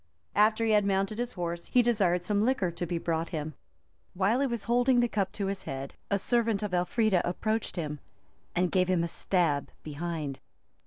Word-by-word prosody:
After 215 Hz, +2 st, +3 dB
he 220 Hz, -, +2 dB
had 210 Hz, -1 st, +5 dB
mounted 195 Hz, +2 st, 0 dB
his 245 Hz, 0 st, -2 dB
horse, 170 Hz, -1 st, -4 dB
he 245 Hz, -, +4 dB
desired 195 Hz, -7 st, +2 dB
some 205 Hz, +2 st, +1 dB
liquor 225 Hz, -8 st, +1 dB
to 175 Hz, +1 st, -4 dB
be 170 Hz, -, -1 dB
brought 165 Hz, 0 st, -1 dB
him: 155 Hz, -1 st, -4 dB, 0.6 s
while 200 Hz, +7 st, +2 dB
he 280 Hz, -, +2 dB
was 235 Hz, -4 st, -3 dB
holding 245 Hz, +1 st, +3 dB
the 240 Hz, -, +3 dB
cup 200 Hz, -4 st, -1 dB
to 200 Hz, -, -2 dB
his 195 Hz, 0 st, -2 dB
head, 135 Hz, 0 st, -5 dB, 0.2 s
a 200 Hz, -, +2 dB
servant 225 Hz, 0 st, +1 dB
of 205 Hz, -3 st, -3 dB
Elfrida 180 Hz, +2 st, +2 dB
approached 215 Hz, +5 st, -1 dB
him, 150 Hz, -4 st, -3 dB, 0.6 s
and 180 Hz, 0 st, +1 dB
gave 185 Hz, -2 st, +3 dB
him 180 Hz, -2 st, +2 dB
a -, -, 0 dB
stab 165 Hz, -4 st, 0 dB
behind. 155 Hz, -2 st, -4 dB
190 Hz, 195 wpm, -29 LUFS, 170-220 Hz, 0.6 s, had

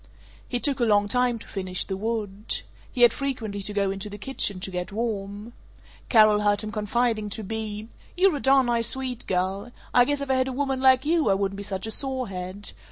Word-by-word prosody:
He 245 Hz, -, -1 dB
took 280 Hz, +1 st, +2 dB
a -, -, +2 dB
long 205 Hz, -2 st, +3 dB
time 245 Hz, +2 st, +1 dB
to -, -, -11 dB
finish 185 Hz, -2 st, -2 dB
the 190 Hz, -, -4 dB
wood. 210 Hz, 0 st, -2 dB, 0.3 s
He 245 Hz, -, +2 dB
had 240 Hz, -, +8 dB
frequently 230 Hz, -8 st, -3 dB
to 200 Hz, -, -2 dB
go 200 Hz, -1 st, 0 dB
into 195 Hz, +1 st, -5 dB
the 205 Hz, -, -8 dB
kitchen 205 Hz, -4 st, 0 dB
to 190 Hz, -, -4 dB
get 180 Hz, +1 st, -4 dB
warm. 210 Hz, 0 st, -4 dB, 0.6 s
Carol 215 Hz, -3 st, +6 dB
heard 205 Hz, 0 st, +2 dB
him 215 Hz, -1 st, -5 dB
confiding 215 Hz, +1 st, 0 dB
to 215 Hz, +2 st, -3 dB
Bea, 215 Hz, 0 st, -5 dB, 0.3 s
"You're 370 Hz, -2 st, +4 dB
a -, -, -5 dB
darn 270 Hz, -1 st, +4 dB
nice 235 Hz, -1 st, +2 dB
Swede 255 Hz, -1 st, -1 dB
girl. 190 Hz, +5 st, -1 dB, 0.2 s
I 245 Hz, -, +6 dB
guess 290 Hz, +1 st, -1 dB
if 280 Hz, -1 st, -2 dB
I -, -, +4 dB
had 260 Hz, 0 st, +2 dB
a 260 Hz, -, -3 dB
woman 270 Hz, -1 st, -1 dB
like 260 Hz, 0 st, +5 dB
you 320 Hz, -5 st, +2 dB
I 195 Hz, -, +4 dB
wouldn't 195 Hz, 0 st, -1 dB
be -, -, -5 dB
such 195 Hz, -1 st, -3 dB
a 220 Hz, -, -3 dB
sorehead. 205 Hz, -7 st, -4 dB
220 Hz, 220 wpm, -25 LUFS, 200-255 Hz, 0.6 s, had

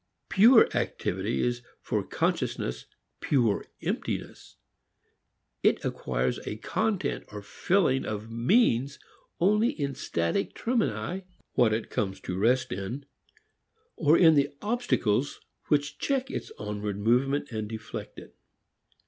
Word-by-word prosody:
"Pure" 225 Hz, +4 st, +7 dB
activity 95 Hz, +5 st, -1 dB
is 120 Hz, 0 st, 0 dB, 0.2 s
for -, -, -1 dB
consciousness -, -, -2 dB, 0.3 s
pure 120 Hz, -8 st, +1 dB, 0.2 s
emptiness. -, -, -4 dB, 1.1 s
It -, -, +2 dB
acquires 65 Hz, -1 st, -1 dB
a -, -, -3 dB
content 210 Hz, -, -1 dB
or 105 Hz, -1 st, -7 dB
filling 135 Hz, -, +1 dB
of 110 Hz, +1 st, -5 dB
meanings 135 Hz, -, +2 dB, 0.4 s
only 210 Hz, +6 st, +4 dB
in 140 Hz, -, -3 dB
static 85 Hz, -8 st, -1 dB
termini, 185 Hz, -, -1 dB, 0.3 s
what 120 Hz, -3 st, +4 dB
it 110 Hz, +1 st, -2 dB
comes 95 Hz, -2 st, -2 dB
to 90 Hz, -, -4 dB
rest 125 Hz, +6 st, +2 dB
in, 100 Hz, +9 st, -4 dB, 0.9 s
or 155 Hz, +1 st, +4 dB
in 165 Hz, -3 st, +7 dB
the 140 Hz, -2 st, +3 dB
obstacles 200 Hz, -, 0 dB, 0.3 s
which 145 Hz, 0 st, 0 dB
check 270 Hz, -1 st, -1 dB
its -, -, -5 dB
onward 105 Hz, -1 st, -4 dB
movement 130 Hz, +7 st, +1 dB
and 110 Hz, -2 st, -4 dB
deflect 110 Hz, -1 st, -7 dB
it. -, -, -12 dB
125 Hz, 115 wpm, -28 LUFS, 105-170 Hz, 1.1 s, Pure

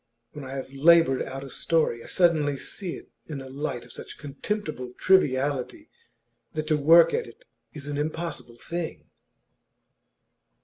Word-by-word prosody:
When 145 Hz, -, -8 dB
I 135 Hz, +1 st, -6 dB
have 135 Hz, 0 st, -6 dB
laboured 155 Hz, -1 st, +5 dB
out 135 Hz, +1 st, -5 dB
a 135 Hz, -, -8 dB
story, 155 Hz, -8 st, +1 dB
I -, -, -11 dB
suddenly 155 Hz, -6 st, +2 dB
see 180 Hz, +5 st, -4 dB
it -, -, -13 dB, 0.2 s
in 150 Hz, -3 st, -5 dB
a 135 Hz, -, -8 dB
light 130 Hz, -3 st, -4 dB
of 120 Hz, -, -13 dB
such -, -, -8 dB
contemptible 145 Hz, -3 st, -4 dB
triviality 140 Hz, -7 st, +2 dB, 0.6 s
that 155 Hz, -1 st, -2 dB
to 155 Hz, -, +4 dB
work 165 Hz, +3 st, +6 dB
at 465 Hz, +1 st, -1 dB
it -, -, -16 dB, 0.3 s
is 145 Hz, -2 st, -8 dB
an 145 Hz, 0 st, -3 dB
impossible 155 Hz, -5 st, -4 dB
thing. 170 Hz, +4 st, -5 dB
145 Hz, 150 wpm, -26 LUFS, 135-170 Hz, 0.6 s, work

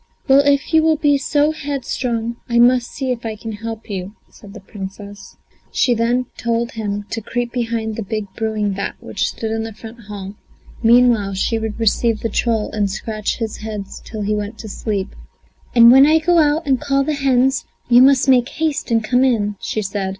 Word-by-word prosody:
"Well, 270 Hz, 0 st, +6 dB
if 280 Hz, +2 st, +2 dB
you 320 Hz, -, +6 dB
will 320 Hz, 0 st, +3 dB
be 290 Hz, -2 st, +2 dB
so 295 Hz, +2 st, +1 dB
headstrong, 255 Hz, -6 st, -3 dB
I 235 Hz, -, +1 dB
must 240 Hz, 0 st, +4 dB
see 265 Hz, -2 st, -3 dB
if 240 Hz, -1 st, -4 dB
I 220 Hz, -1 st, -4 dB
can 225 Hz, +1 st, -7 dB
help 225 Hz, +1 st, -7 dB
you," 195 Hz, 0 st, -6 dB, 0.2 s
said 205 Hz, 0 st, -14 dB
the -, -, -8 dB
Princess. 200 Hz, +1 st, -10 dB, 0.3 s
She 245 Hz, -, +2 dB
then 240 Hz, +2 st, +1 dB
told 235 Hz, 0 st, -1 dB
him 205 Hz, -2 st, -4 dB
to 225 Hz, -, -3 dB
creep 240 Hz, +2 st, -3 dB
behind 230 Hz, -3 st, -2 dB
the 225 Hz, -, -4 dB
big 215 Hz, +1 st, -3 dB
brewing 215 Hz, -2 st, -1 dB
vat 200 Hz, +1 st, -4 dB
which -, -, -2 dB
stood 220 Hz, -1 st, -5 dB
in 225 Hz, 0 st, -1 dB
the 225 Hz, -1 st, -6 dB
front 225 Hz, +1 st, -12 dB
hall; 200 Hz, -2 st, -7 dB, 0.5 s
meanwhile 230 Hz, -4 st, +4 dB
she 225 Hz, +4 st, 0 dB
would 220 Hz, 0 st, -5 dB
receive 225 Hz, 0 st, +1 dB
the 225 Hz, -, -1 dB
troll 225 Hz, 0 st, 0 dB
and 205 Hz, -2 st, 0 dB
scratch 215 Hz, +1 st, -3 dB
his 225 Hz, -2 st, -4 dB
heads 210 Hz, -2 st, -7 dB
till 215 Hz, -2 st, -7 dB
he 210 Hz, +1 st, 0 dB
went 210 Hz, +1 st, -4 dB
to 225 Hz, -, -8 dB
sleep. 200 Hz, -1 st, -3 dB, 0.7 s
"And 235 Hz, 0 st, +9 dB
when 270 Hz, +3 st, +7 dB
I 315 Hz, +1 st, +5 dB
go 340 Hz, +2 st, +3 dB
out 305 Hz, +1 st, +2 dB
and 265 Hz, -3 st, +1 dB
call 275 Hz, 0 st, +1 dB
the 305 Hz, -, -1 dB
hens 265 Hz, -2 st, +1 dB, 0.2 s
you 245 Hz, 0 st, +6 dB
must 270 Hz, 0 st, +5 dB
make 255 Hz, -1 st, +4 dB
haste 310 Hz, -3 st, -2 dB
and 225 Hz, -1 st, +2 dB
come 245 Hz, +4 st, +2 dB
in," 210 Hz, -6 st, +1 dB
she 215 Hz, -, -3 dB
said. 195 Hz, -1 st, -3 dB
230 Hz, 200 wpm, -19 LUFS, 215-255 Hz, 0.7 s, And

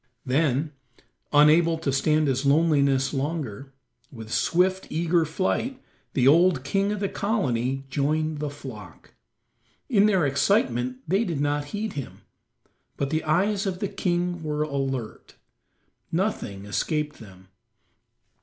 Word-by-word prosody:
Then, 140 Hz, +2 st, +1 dB, 0.6 s
unable 160 Hz, +3 st, +5 dB
to 150 Hz, -3 st, -2 dB
stand 155 Hz, +2 st, +2 dB
his 135 Hz, 0 st, 0 dB
loneliness 140 Hz, -2 st, +3 dB
longer, 135 Hz, -4 st, -3 dB, 0.4 s
with 110 Hz, -3 st, -10 dB
swift, 185 Hz, +2 st, +1 dB
eager 165 Hz, +1 st, +1 dB
flight 190 Hz, -, -1 dB, 0.3 s
the 130 Hz, -1 st, +3 dB
old 165 Hz, -1 st, +5 dB
king 195 Hz, +8 st, 0 dB
of 210 Hz, -, -2 dB
the 200 Hz, -, +1 dB
colony 135 Hz, -, -1 dB
joined 155 Hz, +3 st, -1 dB
the 150 Hz, 0 st, -2 dB
flock. 130 Hz, -7 st, -11 dB, 0.8 s
In 210 Hz, -5 st, +4 dB
their 190 Hz, -6 st, +3 dB
excitement 130 Hz, -, +1 dB
they 195 Hz, +7 st, +2 dB
did 170 Hz, -9 st, -3 dB
not 145 Hz, 0 st, 0 dB
heed 210 Hz, +7 st, -4 dB
him. 140 Hz, -3 st, -7 dB, 0.8 s
But 140 Hz, 0 st, -2 dB
the 155 Hz, 0 st, 0 dB
eyes 195 Hz, +6 st, +1 dB
of 185 Hz, -2 st, -2 dB
the 200 Hz, +1 st, -3 dB
king 175 Hz, -1 st, -1 dB
were 150 Hz, -1 st, -1 dB
alert; 135 Hz, -6 st, -4 dB, 0.8 s
nothing 160 Hz, -, -2 dB
escaped 150 Hz, +8 st, -2 dB
them. 95 Hz, -4 st, -14 dB
150 Hz, 125 wpm, -25 LUFS, 135-180 Hz, 0.8 s, unable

